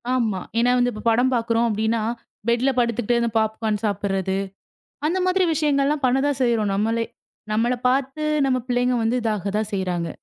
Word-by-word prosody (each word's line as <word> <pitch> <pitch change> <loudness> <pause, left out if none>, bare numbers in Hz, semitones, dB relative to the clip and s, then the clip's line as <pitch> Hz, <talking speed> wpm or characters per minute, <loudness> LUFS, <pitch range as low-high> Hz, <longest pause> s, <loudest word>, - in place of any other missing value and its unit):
ஆமா. 220 -6 0 0.2
ஏன்னா 245 +1 +3
வந்து 245 0 +2
இப்ப 215 - -8
படம் 245 +3 +3
பாக்குறோம் 230 0 +1
அப்படின்னா, 220 +1 0 0.5
பெட்ல 240 +3 +2
படுத்துக்கிட்டு 235 0 +1
அந்த 235 - +1
பாப்க்கார்ன் 220 -1 -1
சாப்பிடுறது. 195 -2 -1 0.7
அந்த 370 +3 0
மாதிரி 370 0 +3
விஷயங்கள் 285 -3 +2
எல்லாம் 290 -1 -1
பண்ணதான் 270 +2 +1
செய்றோம் 225 -4 +1
நம்மளே. 225 +3 0 0.5
நம்மள 235 +3 +2
பார்த்து 270 +3 0 0.2
நம்ம 255 -1 +2
பிள்ளைங்க 245 0 +1
வந்து 235 +3 +1
இதாகதான் 210 0 -1
செய்யறாங்க. 180 -4 -2
235 Hz, 155 wpm, -23 LUFS, 215-255 Hz, 0.7 s, ஏன்னா